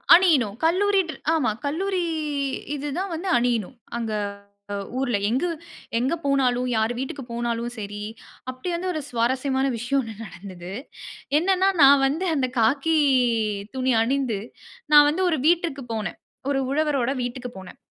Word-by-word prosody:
அணியனும். 285 Hz, -, +4 dB
கல்லூரி 390 Hz, +4 st, +3 dB
ட்ரெ 315 Hz, -, -5 dB, 0.2 s
ஆமா. 305 Hz, -9 st, +2 dB
கல்லூரி 370 Hz, +6 st, -1 dB, 0.7 s
இது 290 Hz, +1 st, -4 dB
தான் 390 Hz, +1 st, -2 dB
வந்து 345 Hz, +4 st, -4 dB
அணியணும். 240 Hz, -2 st, 0 dB, 0.2 s
அங்க 225 Hz, -2 st, -3 dB, 0.7 s
அ -, -, -7 dB
ஊர்ல. 245 Hz, -5 st, +1 dB
எங்க, 260 Hz, +9 st, +1 dB, 0.5 s
எங்க 260 Hz, +7 st, +1 dB
போனாலும் 255 Hz, -3 st, +2 dB
யார் 220 Hz, +2 st, +1 dB
வீட்டுக்கு 270 Hz, +1 st, -4 dB
போனாலும் 235 Hz, 0 st, -2 dB
சரி, 205 Hz, 0 st, -6 dB, 0.5 s
அப்பிடி 255 Hz, +8 st, -5 dB
வந்து 370 Hz, +2 st, -2 dB
ஒரு 310 Hz, -, -2 dB
சுவாரஸ்யமான 260 Hz, +3 st, 0 dB
விஷயம் 260 Hz, +5 st, 0 dB
ஒண்ணு 225 Hz, -2 st, -8 dB
நடந்தது. 180 Hz, -2 st, -9 dB, 0.7 s
என்னன்னா 380 Hz, +2 st, +3 dB
நான் 275 Hz, 0 st, +7 dB
வந்து 320 Hz, +7 st, -1 dB
அந்த 260 Hz, -3 st, 0 dB
காக்கி 280 Hz, +8 st, +3 dB, 0.8 s
துணி 260 Hz, -1 st, +1 dB
அணிந்து, 250 Hz, -3 st, 0 dB, 0.5 s
நான் 295 Hz, 0 st, +9 dB
வந்து 365 Hz, +5 st, 0 dB
ஒரு 315 Hz, -4 st, 0 dB
வீட்டிற்கு 335 Hz, -5 st, +1 dB
போனேன். 215 Hz, -1 st, -4 dB, 0.3 s
ஒரு 275 Hz, -1 st, +1 dB
உழவரோட 280 Hz, -4 st, +1 dB
வீட்டுக்கு 245 Hz, 0 st, -5 dB
போனேன். 190 Hz, -, -12 dB
270 Hz, 140 wpm, -24 LUFS, 235-315 Hz, 0.8 s, நான்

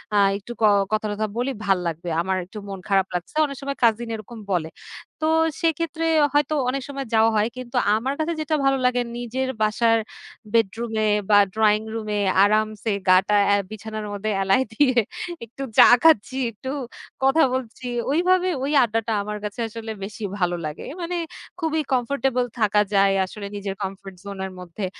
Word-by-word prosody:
আ -, -, +4 dB, 0.2 s
একটু 205 Hz, +4 st, -10 dB
ক -, -, +1 dB, 0.3 s
কথা 215 Hz, 0 st, 0 dB
টথা 215 Hz, +1 st, -2 dB
বলি, 250 Hz, +3 st, 0 dB
ভালো 195 Hz, -2 st, +2 dB
লাগবে। 170 Hz, +1 st, -4 dB
আমার 190 Hz, +2 st, -1 dB
একটু 200 Hz, +4 st, -12 dB
মন 195 Hz, -1 st, -6 dB
খারাপ 195 Hz, -1 st, +3 dB
লাগছে। 180 Hz, -, -5 dB
অনেক 280 Hz, -2 st, -6 dB
সময় 275 Hz, 0 st, -4 dB
কাজিন 230 Hz, 0 st, +3 dB
এরকম 220 Hz, +2 st, -10 dB
বলে। 170 Hz, -4 st, 0 dB, 0.5 s
তো -, -, +1 dB, 0.4 s
সেক্ষেত্রে 330 Hz, 0 st, 0 dB, 0.3 s
হয়তো 295 Hz, +1 st, +2 dB, 0.2 s
অনেক 270 Hz, +2 st, -2 dB
সময় 275 Hz, -1 st, -4 dB
যাওয়া 225 Hz, 0 st, +5 dB
হয়। 210 Hz, 0 st, +3 dB
কিন্তু 255 Hz, 0 st, -8 dB, 0.2 s
আমার 255 Hz, +5 st, -1 dB
কাছে 320 Hz, +2 st, 0 dB
যেটা 310 Hz, 0 st, 0 dB
ভালো 270 Hz, 0 st, +3 dB
লাগে, 250 Hz, 0 st, +2 dB, 0.2 s
নিজের 255 Hz, +2 st, -3 dB
বাসার 225 Hz, +2 st, +3 dB, 0.6 s
বেডরুমে 225 Hz, 0 st, +1 dB, 0.2 s
বা 205 Hz, -, +7 dB, 0.2 s
ড্রয়িং 215 Hz, -1 st, +3 dB
রুমে 215 Hz, -2 st, -2 dB, 0.2 s
আরামসে, 215 Hz, +1 st, +1 dB, 0.2 s
গা 185 Hz, 0 st, +7 dB
টা 210 Hz, -, +2 dB
অ্যা 205 Hz, -, +4 dB
বিছানার 215 Hz, 0 st, -6 dB
মধ্যে 205 Hz, +2 st, -3 dB
এলায় 195 Hz, 0 st, 0 dB, 0.2 s
দিয়ে 255 Hz, +1 st, +2 dB, 0.5 s
একটু 245 Hz, +4 st, -8 dB
চা -, -, +10 dB, 0.2 s
খাচ্ছি, 265 Hz, -5 st, +4 dB
একটু 230 Hz, +4 st, -8 dB, 0.5 s
কথা 270 Hz, +5 st, +5 dB
বলছি 255 Hz, 0 st, -4 dB, 0.2 s
ওইভাবে, 365 Hz, +4 st, +3 dB
ওই 280 Hz, -, -1 dB
আড্ডাটা 225 Hz, -1 st, -1 dB
আমার 210 Hz, +1 st, -4 dB
কাছে 210 Hz, +3 st, -5 dB
আসলে 225 Hz, 0 st, -7 dB
বেশি 210 Hz, +2 st, -7 dB, 0.2 s
ভালো 175 Hz, -1 st, +1 dB
লাগে। 150 Hz, 0 st, -6 dB, 0.2 s
মানে, 345 Hz, +1 st, -3 dB, 0.4 s
খুবই 320 Hz, -2 st, 0 dB
কমফোর্টেবল 255 Hz, 0 st, 0 dB
থাকা 210 Hz, -1 st, +3 dB
যায়, 195 Hz, 0 st, +4 dB
আসলে 200 Hz, +2 st, -8 dB
নিজের 200 Hz, -1 st, -4 dB
কমফোর্ট 195 Hz, 0 st, -6 dB
জোনের 190 Hz, -1 st, -5 dB
মধ্যে। 180 Hz, +3 st, -6 dB
220 Hz, 170 wpm, -23 LUFS, 205-260 Hz, 0.6 s, চা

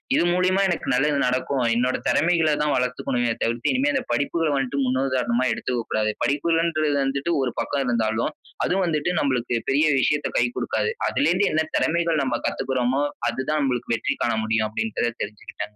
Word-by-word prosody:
இது -, -, +3 dB
மூலியமா 185 Hz, +2 st, +2 dB
எனக்கு 175 Hz, -3 st, -2 dB
நல்லது 145 Hz, +4 st, +2 dB
நடக்கும். 130 Hz, +1 st, 0 dB
என்னோட 125 Hz, +2 st, +1 dB
தெறமைகள 165 Hz, +1 st, +3 dB
தான் 150 Hz, -1 st, +1 dB
வளத்துக்கணுமே 125 Hz, -1 st, 0 dB
தவிர்த்து, 115 Hz, -, 0 dB
இனிமே 265 Hz, +3 st, +1 dB
இந்த 270 Hz, -, 0 dB
படிப்புகள 160 Hz, +2 st, 0 dB
வந்து 135 Hz, 0 st, -2 dB
முன்னுதாரணமா 130 Hz, -1 st, 0 dB
எடுத்துக்க 125 Hz, -2 st, -2 dB
கூடாது. 110 Hz, 0 st, +1 dB
படிப்புகள்ன்றது 155 Hz, 0 st, +1 dB
வந்துட்டு 140 Hz, +4 st, -1 dB
ஒரு 130 Hz, -2 st, 0 dB
பக்கம் 140 Hz, -1 st, -1 dB
இருந்தாலும், 115 Hz, +2 st, 0 dB, 0.3 s
அதும் 190 Hz, +1 st, +1 dB
வந்துட்டு 155 Hz, 0 st, 0 dB
நம்பளுக்கு 125 Hz, -3 st, 0 dB
பெரிய 145 Hz, +3 st, +3 dB
விஷயத்த 150 Hz, +2 st, +1 dB
கை 120 Hz, -, +4 dB
குடுக்காது. 460 Hz, -, -1 dB, 0.2 s
அதுலேருந்து 205 Hz, -8 st, +2 dB
என்ன 160 Hz, 0 st, +2 dB
தெறமைகள் 165 Hz, -2 st, +1 dB
நம்ம 120 Hz, -3 st, -1 dB
கத்துக்குறோமோ, 130 Hz, +1 st, 0 dB, 0.3 s
அது -, -, -5 dB
தான் 155 Hz, 0 st, +1 dB
நம்பளுக்கு 125 Hz, -3 st, -1 dB
வெற்றி -, -, -2 dB
காண 115 Hz, -, +1 dB
முடியும், 110 Hz, 0 st, +1 dB
அப்டின்றத 120 Hz, -, -1 dB
தெரிஞ்சுகிட்டேன். 105 Hz, 0 st, -8 dB
135 Hz, 160 wpm, -23 LUFS, 120-160 Hz, 0.3 s, கை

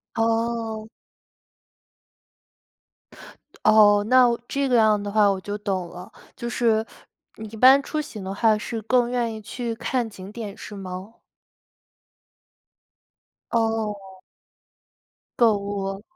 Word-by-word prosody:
哦。 225 Hz, -1 st, -1 dB, 2.8 s
哦， 205 Hz, -1 st, +5 dB
那 255 Hz, -1 st, +6 dB, 0.2 s
这 275 Hz, 0 st, -1 dB
个 250 Hz, -, +3 dB
样 215 Hz, -2 st, +4 dB
的 205 Hz, 0 st, -5 dB
话 210 Hz, -1 st, +4 dB
我 195 Hz, -, -2 dB
就 205 Hz, +2 st, -5 dB
懂 195 Hz, -4 st, -3 dB
了， 180 Hz, +1 st, -11 dB, 0.2 s
就 235 Hz, -1 st, -5 dB
是 225 Hz, -2 st, +1 dB, 0.5 s
你 220 Hz, -, -7 dB
一 220 Hz, -, -11 dB
般 265 Hz, +4 st, +7 dB
出 310 Hz, -, -4 dB
行 215 Hz, -9 st, -9 dB
的 190 Hz, +1 st, -5 dB
话 215 Hz, +1 st, +3 dB
是 225 Hz, +1 st, -5 dB
更 240 Hz, +2 st, +2 dB
愿 240 Hz, -2 st, -1 dB
意 220 Hz, -, -8 dB
去 230 Hz, +2 st, -5 dB
看 240 Hz, 0 st, -2 dB
景 195 Hz, -1 st, -11 dB
点 215 Hz, -3 st, -7 dB
是 210 Hz, -, -9 dB
吗？ 190 Hz, +3 st, -8 dB, 2.4 s
哦。 210 Hz, -4 st, -2 dB, 1.2 s
购 225 Hz, -3 st, +4 dB
物。 200 Hz, -1 st, -4 dB
220 Hz, 125 characters per minute, -23 LUFS, 205-235 Hz, 2.8 s, 般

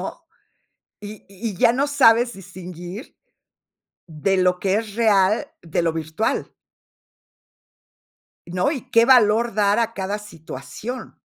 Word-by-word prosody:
¿no? -, -, -7 dB, 0.8 s
Y 210 Hz, +1 st, -10 dB
y 200 Hz, +1 st, -5 dB
ya 230 Hz, -, +4 dB
no 280 Hz, +3 st, 0 dB
sabes 240 Hz, -4 st, +4 dB
distinguir 180 Hz, -, -10 dB, 0.9 s
de 170 Hz, +4 st, -1 dB
lo 180 Hz, -1 st, +2 dB
que 190 Hz, 0 st, 0 dB
es 215 Hz, -2 st, -4 dB
real, 215 Hz, +3 st, +2 dB
de 170 Hz, 0 st, -2 dB
lo 165 Hz, -1 st, +1 dB
virtual. 160 Hz, +6 st, -2 dB, 2.0 s
¿No? 180 Hz, +8 st, 0 dB
Y 270 Hz, -7 st, -4 dB
qué 230 Hz, 0 st, +5 dB
valor 230 Hz, -3 st, +4 dB
dar 205 Hz, 0 st, +2 dB
a 230 Hz, 0 st, 0 dB
cada 200 Hz, +1 st, -3 dB
situación. 210 Hz, -, -8 dB
205 Hz, 120 wpm, -22 LUFS, 180-230 Hz, 2.0 s, qué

